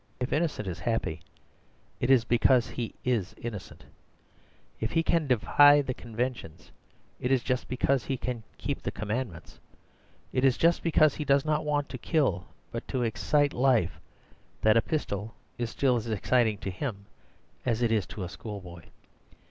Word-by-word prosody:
If 125 +1 -2
Innocent 150 - 0
is 90 -2 -4
happy, 85 -7 -2 0.8
it 125 - 0
is 130 -4 +5
because 120 +1 +3
he 120 -2 -5
IS 115 -7 -1
innocent. 110 -5 -8 0.9
If 110 - -2
he 165 0 +3
can 165 -2 +1
defy 145 +4 +6
the 130 - -2
conventions, 115 -8 -5 0.5
it 125 - -1
is 130 -3 +3
just 125 0 -1
because 130 0 +1
he 135 - -2
can 125 -2 -4 0.2
keep - - -3
the - - -2
commandments. 105 -3 -5 0.7
It 130 - +1
is 135 -2 +4
just 170 +1 +3
because 155 -3 +4
he 150 - -4
does 140 0 +3
not 155 0 0
want 145 -1 0
to 125 - -7
kill 120 - 0 0.2
but - - -5
to 130 -2 -1
excite 120 +7 +1
to - - -8
life 125 -10 +2 0.6
that 110 0 +5
a 115 - +5
pistol 110 -8 -3 0.2
is 120 -1 -1
still 130 +1 +2
as 115 0 -4
exciting 110 +1 +2
to 95 - -1
him 100 -1 -5 0.6
as 120 -1 0
it 115 - +2
is 110 -4 +1
to 100 - -6
a - - -3
schoolboy. 95 -4 -9
120 Hz, 170 wpm, -28 LUFS, 105-135 Hz, 0.9 s, defy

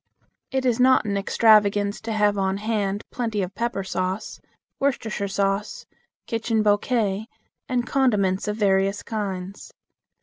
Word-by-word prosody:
It 265 -1 -1
is 245 -2 +2
not 260 -1 +5
an 200 -1 -1
extravagance 205 0 +3
to 225 - -5
have 210 -1 +2
on 190 -1 0
hand 205 -1 -1
plenty 225 -5 -2
of 180 +1 -5
pepper 230 -2 -2
sauce, 185 +2 -3 0.4
Worcestershire 225 -7 -1
sauce, 195 +1 -1 0.4
kitchen 225 -1 0
bouquet, 210 0 +1 0.4
and 245 -1 0
condiments 210 -9 +1
of 210 - -1
various 195 -1 +1
kinds. 195 -3 -5
210 Hz, 130 wpm, -24 LUFS, 195-225 Hz, 0.4 s, not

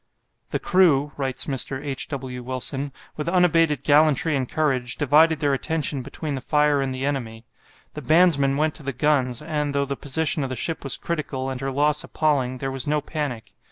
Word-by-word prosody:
"The - - -1
crew," 150 -6 +3
writes 130 -2 -2
Mr. 135 -1 -2
H. 135 -2 -3
W. 130 -3 -5
Wilson, 130 +3 -4 0.2
"with 155 +2 -3
unabated 165 -5 +3
gallantry 155 +2 +3
and 130 -3 -2
courage, 130 -6 0
divided 155 +3 +4
their 145 -2 +2
attention 145 0 0
between 150 +4 -5
the 135 - -4
fire 150 0 +2
and 135 -1 -2
the 130 +1 -3
enemy. 115 -5 -3 0.5
The - - -6
bandsmen 155 -5 +4
went 155 +1 +1
to - - -10
the 140 0 -3
guns, 130 -1 +1
and, 150 -2 -2
though 140 0 +1
the 140 0 -3
position 150 +3 -1
of 135 - -2
the 130 - -3
ship 160 +7 -3
was 135 -2 -1
critical, 140 -5 -3
and 130 0 -5
her 135 - -2
loss 145 +2 +1
appalling, 135 -5 0
there 135 +1 -3
was 135 0 -4
no 150 +1 +2
panic. 145 -6 -5
140 Hz, 195 wpm, -23 LUFS, 130-150 Hz, 0.5 s, divided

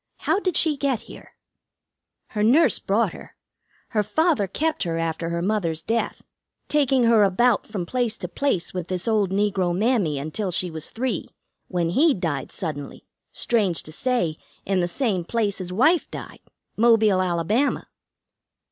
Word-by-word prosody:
How 390 - +1
did 370 -5 0
she 310 -3 +2
get 265 -5 0
here?" - - -14 0.9
"Her 210 - -3
nurse 255 +10 +4
brought - - +1
her. - - -12 0.5
Her 215 - +1
father 230 - +1
kept 315 +11 -1
her 165 -2 -1
after 165 0 -2
her 170 0 -2
mother's 180 -6 -1
death, 230 +1 -2 0.4
taking 270 -4 +2
her 230 -2 +5
about 215 +4 +2
from 200 -5 -4
place 240 +1 -1
to 180 - -5
place 190 -3 -1
with 180 -2 -4
this 185 +1 -2
old 215 -4 +2
negro 190 -3 0
mammy 205 - +1
until 155 +8 -3
she 180 0 -1
was 160 -1 -5
three, 255 +2 -3 0.4
when 170 -2 -1
he 295 - +4
died 160 -8 -3
suddenly, 145 -5 -6 0.3
strange 205 -8 0
to 155 - -10
say, 175 -5 -1 0.3
in 195 -1 +1
the 175 - +1
same 190 -2 -1
place 205 +1 -1
his 180 -1 -5
wife 305 - +3
died, - - -8 0.4
Mobile, 220 -4 +4
Alabama." 185 - 0
205 Hz, 155 wpm, -23 LUFS, 175-240 Hz, 0.9 s, her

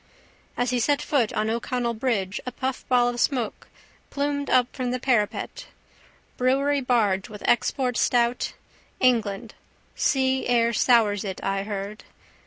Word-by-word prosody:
As 245 0 0
he 250 - +1
set 285 +4 +2
foot 255 -8 +1
on 215 - 0
O'Connell 235 +1 -1
bridge 215 -5 -1
a - - -2
puffball 250 -2 0
of 240 0 -2
smoke 240 -6 -1 0.4
plumed 285 0 -2
up 250 -1 +2
from 255 -2 -2
the 255 +1 -2
parapet. 235 -5 -1 0.7
Brewery 275 +3 +2
barge 215 -7 +1
with 210 -1 -7
export 250 +1 +1
stout. 240 0 +1 0.5
England. 225 -4 +1 0.4
Sea 265 -1 +1
air 235 -1 +2
sours 220 -5 +3
it, 190 -3 -5
I 195 0 -1
heard. 205 0 -5
245 Hz, 135 wpm, -25 LUFS, 215-255 Hz, 0.7 s, sours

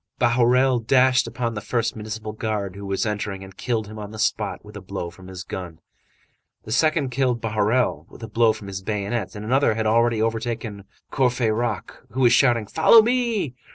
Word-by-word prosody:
Bahorel 125 +1 +3
dashed 130 +2 +3
upon 120 -2 -3
the 105 - -5
first 115 +1 -1
municipal 110 0 -6
guard 105 -3 -3
who 100 0 -7
was 100 +3 -1
entering, 100 -2 -3
and 95 0 -12
killed 115 -1 -2
him 110 +1 -9
on 105 -1 -6
the 110 - -9
spot - - -1
with 105 0 -13
a 105 - -7
blow 95 -2 -5
from 95 +1 -14
his 95 -1 -7
gun; 85 -4 -7 0.8
the 110 - -9
second 155 +2 +2
killed 125 -1 0
Bahorel 110 +3 0
with - - -13
a - - -4
blow 115 +1 +3
from 105 - -8
his 95 0 -5
bayonet. 100 0 -3
Another 115 +3 +1
had 110 0 -1
already 115 +1 +3
overthrown 110 -2 -3 0.3
Courfeyrac, 120 -5 0 0.2
who 130 - -1
was 120 -2 +5
shouting: 120 -5 +3
"Follow 160 - +6
me!" 235 - 0
110 Hz, 185 wpm, -23 LUFS, 105-125 Hz, 0.8 s, Follow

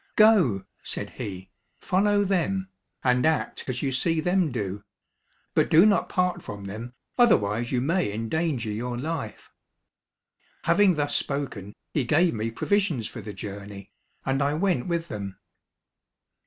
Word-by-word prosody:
"Go," 195 - +5 0.2
said - - -5
he, 95 -2 -7 0.3
"follow 205 +2 +2
them, 150 - 0 0.3
and 125 -1 +3
act 160 0 0
as 130 0 -3
you 135 - 0
see 160 +5 +1
them 180 -1 +2
do; 100 -4 -3 0.7
but - - +3
do 165 +5 +7
not 205 -4 +3
part 180 -1 0
from 100 -7 -8
them, 115 +5 -7 0.2
otherwise 120 - +3
you 125 - +1
may 165 - +1
endanger 115 +2 -1
your 120 +3 -3
life." 145 -4 -5 1.1
Having 180 +3 +4
thus 145 -1 0
spoken, 115 -8 -3 0.2
he 145 - +1
gave 165 +8 +3
me 110 0 -2
provisions 165 - 0
for - - -7
the 105 - -7
journey, 100 -1 -8 0.3
and 135 +1 +1
I 145 +1 +1
went 180 -6 +1
with 170 -1 -1
them. 100 - -6
135 Hz, 140 wpm, -26 LUFS, 105-170 Hz, 1.1 s, do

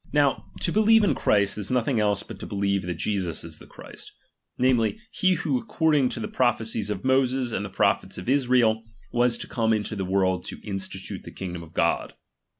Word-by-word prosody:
Now, 145 -2 +2 0.2
to 170 - +1
believe 220 +2 +5
in 205 - +3
Christ 100 0 +1
is 100 - -2
nothing 125 -1 +1
else 105 -1 +1
but - - -10
to - - -7
believe 100 -2 -1
that 90 - -2
Jesus 90 -1 -2
is - - -9
the - - -14
Christ, - - -11 0.5
namely, 125 - +2
he 185 -3 +2
who 215 - 0
ac 235 - -12
cording 155 -9 +2
to 120 - -5
the 110 - -3
prophecies 110 -4 0
of 100 0 -4
Moses 130 -1 +2
and 100 - -2
the 100 - -5
prophets - - 0
of 90 - -7
Israel, 125 -4 +3 0.3
was 120 0 +3
to - - -6
come 115 -1 +1
into 110 0 -2
this 95 -2 -3
world 95 -1 +1
to - - -6
institute 95 -2 -5
the - - -9
kingdom 90 -2 -6
of 80 -1 -14
God. - - 0
110 Hz, 205 wpm, -25 LUFS, 100-130 Hz, 0.5 s, believe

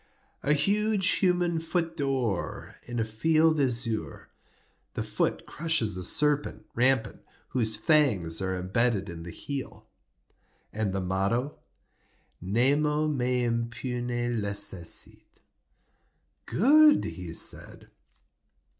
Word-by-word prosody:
"A 150 - +2
huge 200 +5 +2
human 175 -3 +1
foot 165 0 -2
d'or, 130 - -2
in 120 0 -4
a 115 - 0
field 155 +8 +2
azure; 115 -4 -2 0.7
the - - -2
foot - - -1
crushes 155 - -1
a 90 - -4
serpent 150 +7 +1
rampant 125 -1 +1 0.3
whose 110 -4 +1
fangs 105 - +2
are 95 0 -1
imbedded 100 +2 0
in 85 -1 -8
the 85 - -8
heel." 140 +9 -6 0.9
"And 105 -2 -1
the 95 0 -2
motto?" 100 +9 -1 0.8
"Nemo 145 - +1
me 125 -4 0
impune 120 0 -2
lacessit." 100 -4 -2 1.1
"Good!" 300 - +5
he 90 -3 -6
said. 80 - -4
125 Hz, 100 wpm, -27 LUFS, 105-150 Hz, 1.1 s, Good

